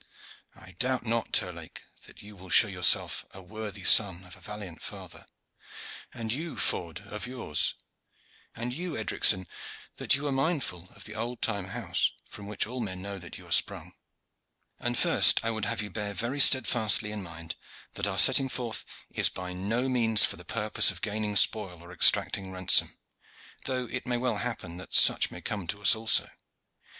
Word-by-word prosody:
I 95 0 -14
doubt 125 0 -1
not, 115 0 -3
Terlake, 85 -3 -3 0.2
that - - -15
you 105 0 -11
will 95 -1 -14
show 110 - +6
yourself 90 -4 +2
a 95 - -10
worthy 105 0 -8
son 95 -4 +5
of 90 0 -13
a - - -19
valiant 105 -5 -10
father; - - -10 0.8
and 110 -1 -4
you, 160 +4 -6
Ford, 85 +2 -2
of 105 +4 -7
yours; 125 -12 -1 0.8
and 120 +2 -5
you, 170 +2 -5
Edricson, 95 -3 +2 0.5
that - - +3
you 145 +2 -6
are 145 - -2
mindful 135 - -3
of - - -12
the 105 - -9
old 115 +2 -6
time 100 -4 -2
house - - -2
from 100 -1 -12
which 105 - -2
all 125 +3 -7
men 95 -5 -6
know 100 -1 -7
that 85 -2 -11
you - - -14
are - - -13
sprung. - - 0 0.9
And 120 0 -3
first - - +4
I 115 - 0
would 110 -2 -4
have 115 -1 -3
you 105 - -8
bear 105 -2 -5
very 120 +7 -4
steadfastly 110 -6 +3
in 105 -1 -6
mind 85 -3 -9 0.4
that 100 - -2
our 95 -1 -4
setting 135 +5 +5
forth 120 -3 -3 0.3
is - - +1
by 90 0 -8
no 110 +8 -2
means 115 -4 +4
for - - -4
the - - -12
purpose 110 -1 +1
of 90 -2 -7
gaining 105 -1 -4
spoil 100 -4 +3
or 85 +1 -15
exacting 95 +2 +2
ransom, 95 -1 +3 0.7
though 130 -1 -3
it 130 +1 -7
may 125 -1 -1
well 120 -3 -2
happen 100 -7 -6
that 95 - -7
such - - +6
may - - -11
come 100 -5 -6
to 105 - -4
us 95 -4 +5
also. 110 0 +3
105 Hz, 180 wpm, -27 LUFS, 95-120 Hz, 0.9 s, show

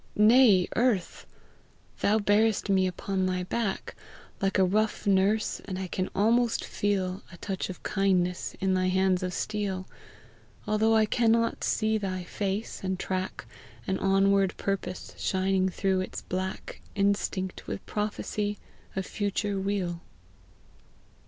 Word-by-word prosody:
Nay, 215 -4 +6
Earth! 230 -7 0 0.7
thou 210 +2 +3
bearest 210 0 +2
me 190 -1 +3
upon 185 +1 -1
thy 180 0 -1
back, 200 +1 -2 0.5
Like 195 +1 +1
a 190 - +5
rough 215 +4 +1
nurse, 200 +2 +2
and 185 - -4
I 190 - -3
can 185 +1 -2
almost 230 +3 +2
feel 195 -2 -1
A 170 - -11
touch 190 +1 -4
of 185 - -8
kindness 185 -3 0
in 190 0 +1
thy 185 0 +2
bands 190 0 +2
of 180 0 -2
steel, 195 -2 -3 0.8
Although 220 +1 +3
I 220 -1 +5
cannot 230 +1 +2
see 220 0 +1
thy 185 -2 -3
face, 200 +3 -3
and 190 -1 -1
track 185 0 -3 0.4
An 190 - -1
onward 195 0 +3
purpose 190 -2 -3
shining 190 0 +1
through 190 0 0
its 185 - -6
black, 185 +1 -4
Instinct 200 -2 -1
with - - -5
prophecy 210 0 -2 0.4
of 190 -1 -2
future 205 0 -2
weal. 190 -3 -2
195 Hz, 135 wpm, -28 LUFS, 185-210 Hz, 0.8 s, Nay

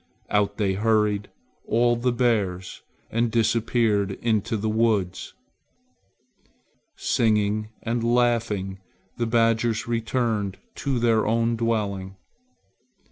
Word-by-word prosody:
Out 100 -1 +1
they 100 -3 +1
hurried, 105 0 +1 0.4
all 120 +1 +3
the 120 +1 0
bears, 105 -7 -1 0.3
and 115 +1 +1
disappeared 110 -3 +1
into 110 +1 -1
the 110 +1 -2
woods. 110 -4 0 1.6
Singing 110 -1 +1
and 115 0 -1
laughing, 115 -5 +1 0.4
the 120 - -1
badgers 115 0 +1
returned 115 -4 -1 0.2
to 135 -3 -1
their 115 -2 +2
own 115 +1 +1
dwelling. 100 -5 -2
110 Hz, 95 wpm, -24 LUFS, 105-115 Hz, 1.6 s, all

